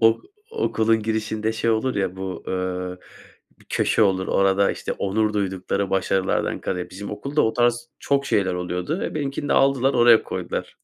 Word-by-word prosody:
Ok 115 0 +4 0.3
okulun 115 - +1
girişinde 110 0 -1
şey 115 +1 0
olur 115 +4 0
ya, 95 -2 -1
bu, 95 -1 -6
ııı, 90 -1 -3 0.7
köşe 110 - +2
olur, 95 -2 +2
orada, 100 0 +3
işte, - - -4
onur 105 +2 0
duydukları 95 -1 -1
başarılardan 95 0 0
kare, 90 -1 -3
bizim 100 +2 -7
okulda, 140 +8 -1
o 110 - +2
tarz 120 0 +1
çok 140 0 0
şeyler 95 -3 +1
oluyordu. 90 - -3
E, - - -3
benimkini 145 -1 -3
de - - +2
aldılar, 135 0 +3
oraya 120 -1 +6
koydular. - - -5
105 Hz, 160 wpm, -23 LUFS, 95-120 Hz, 0.7 s, oraya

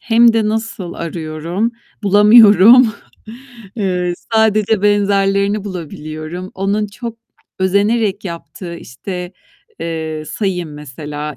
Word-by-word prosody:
Hem 235 0 +4
de 220 -2 +1
nasıl 220 -5 -3
arıyorum? 170 +6 -3 0.3
Bulamıyorum. 210 +3 +7 0.9
Eee, 180 -4 -1 0.2
sadece 215 -1 +2
benzerlerini 200 0 +2
bulabiliyorum. 165 -1 -7
Onun 200 +2 -1
çok 230 +2 -8 0.4
özenerek 200 +2 +1
yaptığı, 170 0 -7
işte, 180 - -7 0.5
eee, 160 -2 -4
sayayım 180 -7 -3
mesela 150 0 -7
195 Hz, 90 wpm, -16 LUFS, 170-210 Hz, 0.9 s, Bulamıyorum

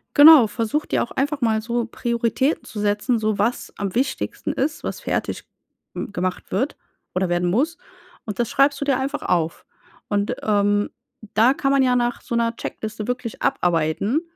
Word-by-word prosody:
Genau 290 -5 +9
versuche 230 +7 -2
dir - - +1
auch - - -8
einfach 285 +1 -1
mal 220 -2 +2
so 235 +1 -1
Prioritäten 235 +5 -1
zu 215 - -8
setzen, 210 +4 +1
so 215 -1 0
was 230 +5 -1
am 195 -2 -3
wichtigsten 265 +4 -1
ist, 295 +4 -2
was - - -4
fertig - - -2 0.5
hm, - - -5
gemacht 185 -2 -3
wird 255 +10 -1 0.4
oder 185 0 +1
werden 175 0 +1
muss. 290 - +1 0.5
Und 210 -1 -6
das 235 - +1
schreibst 280 +1 +3
du - - 0
dir 270 -2 +2
einfach 275 +2 -2
auf. 165 -2 -1 0.4
Und, 205 0 0
ähm, 205 -1 +2 0.4
da 230 +5 +5
kann 275 -1 0
man 275 -1 +4
ja 250 -1 +3
nach 240 0 0
so 235 - -4
'ner 230 0 +1
Checkliste 220 -2 -5
wirklich 245 -2 -4
abarbeiten, 175 - +1
230 Hz, 175 wpm, -22 LUFS, 205-265 Hz, 0.5 s, Genau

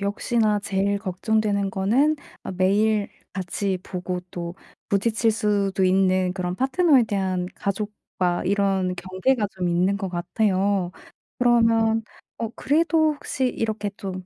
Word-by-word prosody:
역시나 210 +1 +1
제일 200 0 0
걱정되는 200 +1 0
거는 250 +12 +2 0.3
어 - - -6
매일 205 +3 +2 0.2
같이 190 0 -2
보고 180 -1 -4
또 170 0 -5 0.3
부딪칠 220 +3 +2
수도 200 -3 +1
있는 185 -1 +3
그런 180 -1 -3
파트너에 270 -1 +4
대한 190 -3 -1
가족과 200 -3 -2
이런 195 -1 +1
경계가 195 +6 0
좀 180 -1 -1
있는 180 +3 +2
것 195 -2 -3
같아요. 185 +1 0 0.5
그러면 230 -2 +3 0.4
어 230 - -2
그래도 315 +1 +2
혹시 265 -2 -2
이렇게 220 -4 -2
좀 185 -2 -6
200 Hz, 260 characters per minute, -24 LUFS, 185-220 Hz, 0.5 s, 파트너에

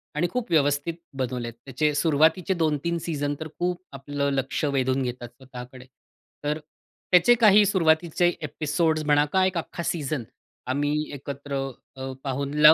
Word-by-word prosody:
आणि 160 +4 +1
खूप 250 -6 -3
व्यवस्थित 145 0 +2 0.2
बनवलेत. 125 -2 -3
त्याचे 150 +3 0
सुरुवातीचे 160 +4 +3
2-3 165 0 0
सीझन 145 -3 -1
तर 160 - -5
खूप 175 0 -1
आपलं 140 +1 -2
लक्ष 135 +2 -1
वेधून 130 0 +1
घेतात 125 -1 -5
स्वतःकडे. 130 -1 -11 0.6
तर 150 +1 -1 0.5
त्याचे 180 +7 +7
काही 210 -1 +7
सुरुवातीचे 170 -2 +3
एपिसोड्स 155 +1 0
म्हणा 145 0 +4
का 190 -1 +4
एक 185 -1 0
अख्खा 170 +1 -4
सीझन 150 -5 -2 0.4
आम्ही 145 +3 0 0.2
एकत्र 140 0 -6 0.4
अ, 130 0 -5
पाहून 140 +1 -2
ला 150 +1 +10
145 Hz, 140 wpm, -25 LUFS, 135-170 Hz, 0.6 s, ला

